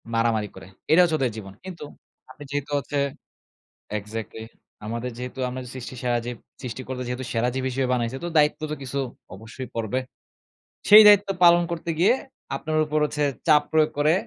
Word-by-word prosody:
মারামারি 115 -3 +1
করে। 95 0 -11 0.2
এটা 165 +3 +7
হচ্ছে 160 -3 +2
ওদের 130 -4 +1
জীবন। 95 -3 -8
কিন্তু 180 -4 -8 0.5
আপনি 145 - -11
যেহেতু 145 +1 -3
হচ্ছে 145 +1 -4 1.0
এক্সাক্টলি। 110 +2 -7 0.4
আমাদের 115 +3 -3
যেহেতু 125 +1 -7
আমরা 130 +1 -5
যে 125 - -10
সৃষ্টি 130 0 -7
সেরা 120 -1 +1
জীব। 120 0 -4 0.3
সৃষ্টিকর্তা 125 +1 -5
যেহেতু 125 +1 -4
সেরা 115 +1 +1
জীব 130 0 -2
হিসেবে 130 0 -1
বানাইছে, 120 +1 -2
তো - - -2
দায়িত্ব 150 +1 +3
তো 150 - -1
কিছু 135 +1 -4 0.4
অবশ্যই 115 +6 -9
পড়বে। 115 +2 -1 0.9
সেই 215 +1 +11
দায়িত্ব 205 -1 +7 0.2
পালন 175 0 +7
করতে 170 0 -4
গিয়ে 200 +7 +5 0.4
আপনার 155 +3 -2
উপর 150 0 0
হচ্ছে 150 0 -2 0.2
চাপ 150 -2 +6
প্রয়োগ 155 -1 +4
করে 150 +2 +4
130 Hz, 170 wpm, -24 LUFS, 120-155 Hz, 1.0 s, সেই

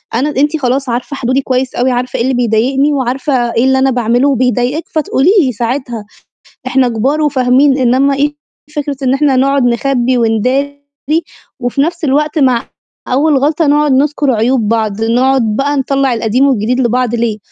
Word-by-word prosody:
أنا 265 +6 0
أنتِ 295 +3 +1
خلاص 265 -1 -1
عارفة 245 +4 -3
حدودي 260 +1 -1
كويس 255 -1 -2
أوي، 255 +2 +1
عارفة 245 0 -2
إيه - - 0
اللي 260 +2 0
بيضايقني 250 +5 +1
وعارفة 260 -2 -1
إيه 230 - +1
اللي 265 0 +2
أنا 265 0 +2
باعمله 245 +2 +1
وبيضايقِك 255 +3 0
فتقولي 305 0 0
لي 265 -5 0
ساعتها، 240 -1 -4 0.6
إحنا 260 0 +2
كبار 260 +7 -1
وفاهمين، 270 -1 +2
إنّما 265 +2 +2
إيه 290 +2 -1 0.4
فكرة 290 -1 -3
إن 260 0 +2
إحنا 275 -1 +2
نقعد 275 +1 +2
نخبّي 245 +1 0
ونداري 255 +5 -1 0.8
وفي 245 +2 -1
نَفْس 340 +4 -2
الوقت 300 +2 0
مع 255 -4 +1 0.4
أول 285 +3 +2
غلطة 300 +4 +1
نقعد 295 0 +2
نُذكُر 285 +1 +1
عيوب 230 0 +1
بعض، 220 -1 -1
نقعد 255 +4 +2
بقى 285 +4 0
نطلّع 275 -1 0
القديم 235 +4 +1
والجديد 250 -1 0
لبعض، 245 -1 0
ليه؟" 230 -2 -1
260 Hz, 165 wpm, -13 LUFS, 245-280 Hz, 0.8 s, اللي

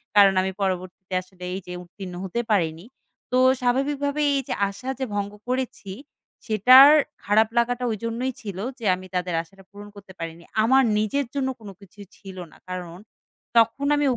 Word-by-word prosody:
কারণ 200 -1 +7
আমি 190 0 -2
পরবর্তীতে 185 0 -3
আসলে 185 0 -16
এই 190 - -3
যে - - -7
উত্তীর্ণ 180 +1 -10
হতে 190 +5 -3
পারিনি। 165 -3 0 0.5
তো 250 - +2 0.2
স্বাভাবিকভাবে 280 +3 0
এই - - +2
যে - - -2 0.2
আশা 200 +7 -8
যে 265 - -1
ভঙ্গ 205 0 -2 0.2
করেছি, 255 -6 -3 0.5
সেটার 255 +6 +8 0.3
খারাপ 215 +2 +3
লাগাটা 245 +1 +1
ঐজন্যই 230 +4 -3
ছিল 200 -5 -7 0.2
যে 230 - -7
আমি 185 +1 -11
তাদের 180 -1 -1
আশাটা 195 +4 -19
পূরণ 205 +1 -11
করতে 200 -2 -13
পারিনি। 165 0 -7 0.2
আমার 265 +4 +5
নিজের 215 +7 0
জন্য 270 -2 0
কোন 210 -3 -10
কিছুই 200 +1 -14
ছিল 190 -2 -11
না। - - -18
কারণ 175 -2 -6 0.6
তখন 230 +5 +3
আমি 290 0 +1
205 Hz, 165 wpm, -24 LUFS, 185-250 Hz, 0.6 s, সেটার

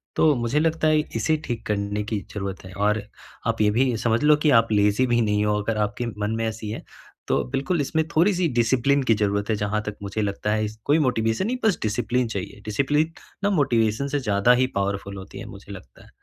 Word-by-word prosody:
तो 155 -2 +4
मुझे 120 +5 0
लगता 160 0 +1
है 155 0 +4 0.2
इसे 135 +8 +1
ठीक 115 -2 -4
करने 105 0 -1
की 105 - 0
ज़रूरत 95 -2 -5
है 95 - -10
और 105 +2 +1 0.5
आप 115 -1 0
ये 105 - +4
भी 125 +1 +2
समझ 115 +1 +1
लो 150 0 +6
कि - - +6
आप 115 -1 -2
लेज़ी 105 +4 +3
भी 120 0 +2
नहीं 105 -1 +1
हो, 105 0 +1
अगर 110 +1 -2
आपके 105 +3 -1
मन 105 +2 -1
में 115 0 -1
ऐसी 110 -1 -5
है, 110 - -5 0.4
तो - - +1
बिल्कुल 145 +5 0
इसमें 160 +3 0
थोड़ी-सी 180 +1 +3
डिसिप्लिन 130 +4 +2
की 115 - +3
ज़रूरत 100 +1 0
है 110 - +2
जहाँ 105 +1 -1
तक 105 -1 -4
मुझे 100 +2 -3
लगता 105 +1 -2
है 110 0 +1
इस 105 +1 -6
कोई 150 +3 +3
मोटिवेशन 120 - +1
नहीं, 250 +1 -1
बस 210 -5 +3
डिसिप्लिन 120 +3 0
चाहिए। 100 -1 -6
डिसिप्लिन 145 +9 +1 0.3
ना 200 - +3
मोटिवेशन 120 - +1
से 145 0 -1
ज़्यादा 105 -1 +2
ही 130 - +3
पावरफुल 100 0 -2
होती 95 +1 -9
है - - -7
मुझे 100 +1 -11
लगता 75 -11 -12
है, - - -19
110 Hz, 220 wpm, -24 LUFS, 105-135 Hz, 0.5 s, लो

